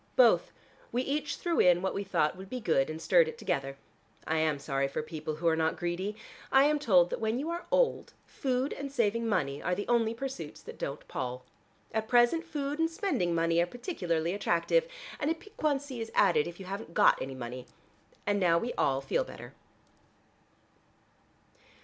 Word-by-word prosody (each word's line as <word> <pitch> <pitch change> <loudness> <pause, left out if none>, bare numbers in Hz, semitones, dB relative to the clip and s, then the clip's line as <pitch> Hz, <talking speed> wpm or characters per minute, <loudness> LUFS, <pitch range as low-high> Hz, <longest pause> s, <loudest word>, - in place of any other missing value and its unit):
"Both. - - +5 0.4
We 250 +2 0
each 290 +2 -2
threw 340 -2 -1
in 180 0 +5
what 190 - 0
we 200 - -2
thought 155 -5 +1
would 190 +1 -10
be 255 - -4
good, 160 - +1
and 155 0 -5
stirred 165 0 +4
it 160 - -6
together. 135 0 -2 0.5
I 160 - 0
am 155 -2 +1
sorry 140 -1 -1
for 140 - -3
people 155 0 -5
who 170 +2 -2
are 165 - +4
not 160 0 0
greedy. 180 +4 -2 0.4
I 270 0 +6
am 300 +1 +3
told 180 -10 +4
that - - -2
when 220 +1 0
you 300 +5 -2
are 340 +1 -5
old, - - +1
food 260 0 -1
and 280 -1 -6
saving 230 -2 +1
money 140 -9 0
are 180 - 0
the 205 - -4
only 230 -1 +2
pursuits 230 - -6
that - - -10
don't 140 +2 -5
pall. 125 0 -4 0.5
At 220 0 -1
present 245 +7 +4
food 295 -3 -4
and 325 0 +2
spending 330 - -1
money 165 0 +2
are 175 - +1
particularly 175 - -2
attractive, 205 - +1 0.3
and 290 - 0
a 325 - +1
piquancy 290 - -3
is 225 - -4
added 155 -4 +4
if 170 +1 -9
you 190 - -8
haven't 195 -2 -6
got - - +5
any 135 0 -4
money. 125 0 -7 0.6
And 205 0 +1
now 170 -3 +4
we 235 +8 -2
all 135 0 +2
feel - - 0
better." - - -11
200 Hz, 190 wpm, -30 LUFS, -, 0.6 s, I